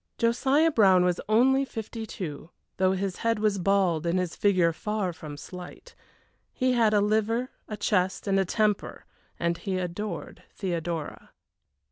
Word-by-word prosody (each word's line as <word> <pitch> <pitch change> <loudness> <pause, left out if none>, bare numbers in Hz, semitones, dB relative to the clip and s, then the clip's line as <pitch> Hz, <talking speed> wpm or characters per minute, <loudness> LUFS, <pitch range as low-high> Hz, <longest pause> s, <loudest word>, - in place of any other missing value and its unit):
Josiah 270 +7 +3
Brown 190 - +5
was 180 -1 0
only 265 +5 +4
fifty 225 -2 -6
two, 160 -6 -6 0.3
though 185 0 +3
his 190 -1 -2
head 230 -1 0
was 210 -2 +1
bald 180 -4 +2
and 170 +2 +1
his 180 -2 -2
figure 185 -5 +3
far 210 0 -2
from 150 -2 -9
slight. 180 - -10 0.6
He 255 -1 +1
had 230 -3 +3
a 210 -1 +3
liver, 220 +4 +1 0.2
a 210 - -5
chest, 190 -2 0
and 195 -1 +2
a - - +3
temper, 210 +2 -1 0.3
and 170 0 0
he 190 -3 -2
adored 185 +4 -5
Theodora. 170 -4 -4
200 Hz, 150 wpm, -27 LUFS, 180-220 Hz, 0.6 s, Brown